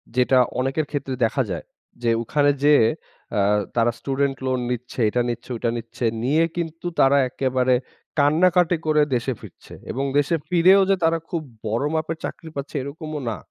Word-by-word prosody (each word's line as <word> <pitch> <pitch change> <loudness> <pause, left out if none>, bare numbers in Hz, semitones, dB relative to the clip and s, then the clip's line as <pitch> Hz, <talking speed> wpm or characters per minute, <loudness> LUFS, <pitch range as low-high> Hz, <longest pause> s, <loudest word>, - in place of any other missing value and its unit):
যেটা 125 +1 +4 0.2
অনেকের 135 +4 0
ক্ষেত্রে 135 -2 -3
দেখা 135 +4 0
যায়, 85 - -4 0.4
যে 115 - +2
ওখানে 145 +4 +2
যেয়ে 145 -6 +6 0.5
আ - - +3 0.4
তারা 120 0 +3
স্টুডেন্ট 135 0 -1
লোন 130 -1 0
নিচ্ছে, 125 +1 -5
এটা 120 +3 0
নিচ্ছে 120 +1 -5
ওইটা 115 +1 -1
নিচ্ছে 115 +1 -7 0.2
নিয়ে 150 +6 +3
কিন্তু 165 0 -4
তারা 135 +1 +5
একেবারে 130 -1 +1 0.4
কান্নাকাটি 175 +4 +4
করে 150 -1 +4
দেশে 125 +2 -1
ফিরছে। - - -13 0.2
এবং 135 +2 -2
দেশে 145 +4 +2
ফিরেও 185 +3 +6
যে 195 - +5
তারা 165 0 +3
খুব 170 - -2 0.3
বড় 115 +6 0
মাপের 160 +1 -2
চাকরি 165 - -7
পাচ্ছে 140 +1 -6
এরকমও 150 +2 -6
না। 110 - -3
140 Hz, 165 wpm, -23 LUFS, 125-160 Hz, 0.5 s, যেয়ে